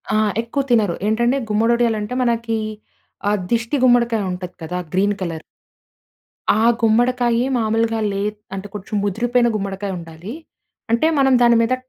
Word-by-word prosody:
ఆ! -, -, +3 dB, 0.2 s
ఎక్కువ 235 Hz, +5 st, -2 dB
తినరు 215 Hz, -8 st, +3 dB
ఏంటంటే, 235 Hz, +4 st, +2 dB
గుమ్మడి 225 Hz, +3 st, +2 dB
వడియాలు 235 Hz, -2 st, +1 dB
అంటే, 210 Hz, +4 st, -4 dB
మనకీ 230 Hz, -2 st, 0 dB, 0.7 s
ఆ -, -, +2 dB, 0.2 s
దిష్టి 230 Hz, +4 st, 0 dB
గుమ్మడికాయుంటది 220 Hz, -7 st, +1 dB
కదా! 180 Hz, +3 st, -3 dB, 0.2 s
Green 200 Hz, +2 st, +2 dB
colour. 165 Hz, -3 st, -4 dB, 1.1 s
ఆ -, -, +1 dB, 0.2 s
గుమ్మడికాయి 240 Hz, +1 st, +2 dB
మాములుగా 225 Hz, 0 st, +1 dB
లెద్ 205 Hz, +2 st, -3 dB, 0.2 s
అంటే, 195 Hz, +1 st, -6 dB
కొంచెం 210 Hz, +1 st, -6 dB
ముదిరిపోయిన 240 Hz, +4 st, +1 dB
గుమ్మడికాయుండాలీ. 195 Hz, -2 st, -5 dB, 0.6 s
అంటే, 235 Hz, +7 st, +3 dB
మనం 270 Hz, -1 st, +4 dB
దాని 235 Hz, -1 st, +5 dB
మీద 230 Hz, +2 st, +1 dB
225 Hz, 130 wpm, -20 LUFS, 200-235 Hz, 1.1 s, దాని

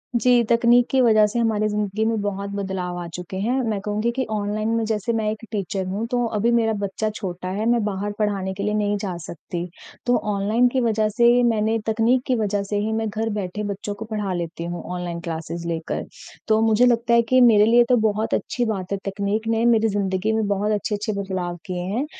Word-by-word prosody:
जी, 240 Hz, +1 st, +4 dB
तकनीक 235 Hz, +1 st, +4 dB
की 265 Hz, -, +3 dB
वज़ह 215 Hz, -3 st, +5 dB
से 240 Hz, -, -1 dB
हमारी 215 Hz, -2 st, +1 dB
ज़िंदगी 210 Hz, 0 st, -1 dB
में 225 Hz, -1 st, 0 dB
बहुत 200 Hz, 0 st, -3 dB
बदलाव 190 Hz, -3 st, -3 dB
आ 175 Hz, -, -5 dB
चुके 180 Hz, +2 st, -6 dB
हैं। 230 Hz, +6 st, 0 dB, 0.2 s
मैं 210 Hz, -2 st, -1 dB
कहूँगी 210 Hz, +3 st, -1 dB
कि 265 Hz, -, 0 dB
ऑनलाइन 215 Hz, +1 st, -1 dB
में 230 Hz, -, +1 dB
जैसे 220 Hz, +1 st, -1 dB
मैं 220 Hz, -2 st, 0 dB
एक 220 Hz, +1 st, -7 dB
टीचर 195 Hz, -2 st, -2 dB
हूँ, 200 Hz, +4 st, -2 dB
तो 245 Hz, 0 st, 0 dB
अभी 230 Hz, +3 st, +2 dB
मेरा 225 Hz, -2 st, +2 dB
बच्चा 200 Hz, +2 st, -2 dB
छोटा 185 Hz, -2 st, -5 dB
है, 205 Hz, +4 st, -2 dB
मैं 235 Hz, -2 st, +2 dB
बाहर 205 Hz, 0 st, -2 dB
पढ़ाने 195 Hz, -3 st, -1 dB
के 200 Hz, -, -5 dB
लिए 210 Hz, +1 st, 0 dB
नहीं 205 Hz, -1 st, +1 dB
जा 185 Hz, -4 st, -3 dB
सकती। 170 Hz, +1 st, -6 dB, 0.4 s
तो 245 Hz, 0 st, +3 dB, 0.2 s
ऑनलाइन 215 Hz, +5 st, +2 dB
की 255 Hz, +1 st, 0 dB
वज़ह 220 Hz, -2 st, +1 dB
से 235 Hz, +3 st, +4 dB
मैंने 220 Hz, 0 st, +1 dB
तकनीक 230 Hz, +3 st, +2 dB
की 255 Hz, -, +2 dB
वज़ह 205 Hz, -3 st, 0 dB
से 205 Hz, +1 st, -2 dB
ही 215 Hz, +2 st, -1 dB
मैं 225 Hz, 0 st, -1 dB
घर 220 Hz, +2 st, -2 dB
बैठे 205 Hz, 0 st, -3 dB
बच्चों 205 Hz, +1 st, -4 dB
को 220 Hz, +2 st, -7 dB
पढ़ा 210 Hz, -3 st, -3 dB
लेती 170 Hz, -1 st, -4 dB
हूँ, 175 Hz, +1 st, -5 dB
ऑनलाइन 175 Hz, -1 st, -4 dB
क्लासेस 165 Hz, +1 st, -5 dB
लेकर। 165 Hz, -1 st, -3 dB, 0.4 s
तो 220 Hz, -1 st, +3 dB
मुझे 225 Hz, +2 st, +4 dB
लगता 235 Hz, -1 st, +2 dB
है 235 Hz, -, +6 dB
कि 255 Hz, -, +6 dB
मेरे 215 Hz, -4 st, +6 dB
लिए 240 Hz, +2 st, +6 dB
तो 250 Hz, -, +5 dB
बहुत 215 Hz, +1 st, -1 dB
अच्छी 245 Hz, -1 st, -1 dB
बात 195 Hz, -4 st, -3 dB
है, 200 Hz, -, 0 dB
तकनीक 200 Hz, +3 st, -2 dB
ने 225 Hz, 0 st, +1 dB
मेरी 225 Hz, -2 st, +4 dB
ज़िंदगी 200 Hz, +1 st, 0 dB
में 220 Hz, -1 st, +1 dB
बहुत 205 Hz, +1 st, 0 dB
अच्छे-अच्छे 210 Hz, +1 st, -1 dB
बदलाव 180 Hz, -3 st, -3 dB
किए 180 Hz, -1 st, -4 dB
हैं 255 Hz, +5 st, 0 dB
210 Hz, 220 wpm, -22 LUFS, 195-225 Hz, 0.4 s, है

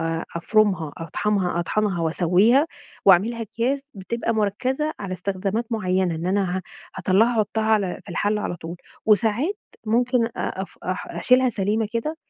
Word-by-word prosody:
آآ، 165 Hz, 0 st, -2 dB
أفرُمها 185 Hz, -5 st, +2 dB
أطحَنها- 180 Hz, +1 st, -1 dB
أطحَنها 200 Hz, 0 st, 0 dB
وأسوّيها 185 Hz, -, +3 dB, 0.4 s
وأعملها 210 Hz, +5 st, +4 dB
أكياس 265 Hz, +6 st, -2 dB
بتبقى 230 Hz, +4 st, -2 dB
مُركّزة 255 Hz, +9 st, 0 dB
على 195 Hz, -2 st, -4 dB
استخدامات 195 Hz, +4 st, -2 dB
مُعينة، 185 Hz, -4 st, +1 dB
إن 165 Hz, +2 st, -4 dB
أنا 190 Hz, -1 st, +1 dB
ه -, -, -7 dB, 0.4 s
هاطَلّعها 200 Hz, +6 st, +3 dB
أحُطّها 215 Hz, +1 st, 0 dB
على 210 Hz, -4 st, +1 dB
في -, -, -16 dB
الحلّة 205 Hz, +4 st, 0 dB
على 175 Hz, -, -3 dB
طول. 170 Hz, +1 st, -7 dB, 0.3 s
وساعات 225 Hz, -, +2 dB, 0.3 s
ممكن 240 Hz, +1 st, +2 dB
أف 190 Hz, 0 st, -4 dB
أ 185 Hz, -, -1 dB, 0.2 s
أشيلها 255 Hz, +6 st, +4 dB
سليمة 210 Hz, +1 st, 0 dB
كده، 270 Hz, +8 st, -2 dB
205 Hz, 140 wpm, -23 LUFS, 185-230 Hz, 0.4 s, وأعملها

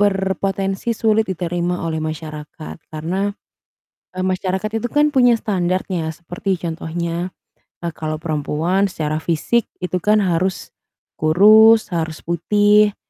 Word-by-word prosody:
Berpotensi 195 Hz, +2 st, 0 dB
sulit 220 Hz, -1 st, +2 dB
diterima 175 Hz, -1 st, -2 dB
oleh 160 Hz, -1 st, -2 dB
masyarakat 155 Hz, 0 st, -6 dB
karena, 185 Hz, +6 st, -3 dB, 0.8 s
eee, 185 Hz, 0 st, -4 dB
masyarakat 185 Hz, +2 st, -1 dB
itu 225 Hz, +2 st, -1 dB
kan 295 Hz, 0 st, +4 dB
punya 245 Hz, -5 st, +4 dB
standart-nya, 180 Hz, -4 st, -1 dB
seperti 175 Hz, +3 st, -4 dB
contohnya, 170 Hz, +1 st, -3 dB, 0.5 s
eee, 170 Hz, -, -2 dB
kalau 155 Hz, -1 st, -4 dB
perempuan 160 Hz, +5 st, 0 dB
secara 155 Hz, -2 st, -3 dB
fisik 175 Hz, +9 st, 0 dB
itu 180 Hz, 0 st, -3 dB
kan 210 Hz, +3 st, +3 dB
harus 185 Hz, -2 st, -1 dB, 0.5 s
kurus, 215 Hz, +6 st, +6 dB
harus 160 Hz, -2 st, -3 dB
putih, 205 Hz, +5 st, +3 dB
180 Hz, 115 wpm, -20 LUFS, 165-205 Hz, 0.8 s, kurus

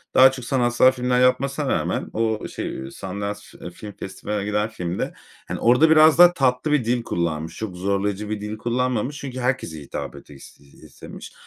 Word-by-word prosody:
Daha 130 Hz, 0 st, +8 dB
çok 130 Hz, -2 st, -8 dB
sanatsal 125 Hz, -1 st, +3 dB
filmler 125 Hz, -1 st, 0 dB
yapmasına 135 Hz, +3 st, +1 dB
rağmen -, -, -1 dB
o 110 Hz, -1 st, -1 dB
şey 65 Hz, +1 st, -6 dB
Sundance, 100 Hz, +3 st, -5 dB, 0.2 s
eee, -, -, -6 dB
Film 105 Hz, +4 st, -10 dB
Festivali'ne 100 Hz, +1 st, -5 dB
giden 105 Hz, +1 st, 0 dB
filmde, 90 Hz, -5 st, -4 dB, 0.3 s
hani, -, -, -4 dB
orada 125 Hz, +7 st, +5 dB
biraz 155 Hz, 0 st, +6 dB
daha 175 Hz, 0 st, +9 dB
tatlı 135 Hz, 0 st, +1 dB
bir 145 Hz, -6 st, +2 dB
dil 120 Hz, 0 st, 0 dB
kullanmış. 80 Hz, -5 st, -3 dB
Çok 105 Hz, -5 st, -5 dB
zorlayıcı 100 Hz, +2 st, -2 dB
bir 105 Hz, -1 st, -3 dB
dil 105 Hz, +1 st, -5 dB
kullanmamış 125 Hz, +3 st, -1 dB
çünkü 130 Hz, -3 st, -6 dB
herkese 125 Hz, -, -2 dB
hitap 70 Hz, -, -6 dB
etis 70 Hz, -2 st, -14 dB
iii, 70 Hz, -1 st, -19 dB
istemiş. -, -, -11 dB
115 Hz, 175 wpm, -23 LUFS, 100-130 Hz, 0.3 s, daha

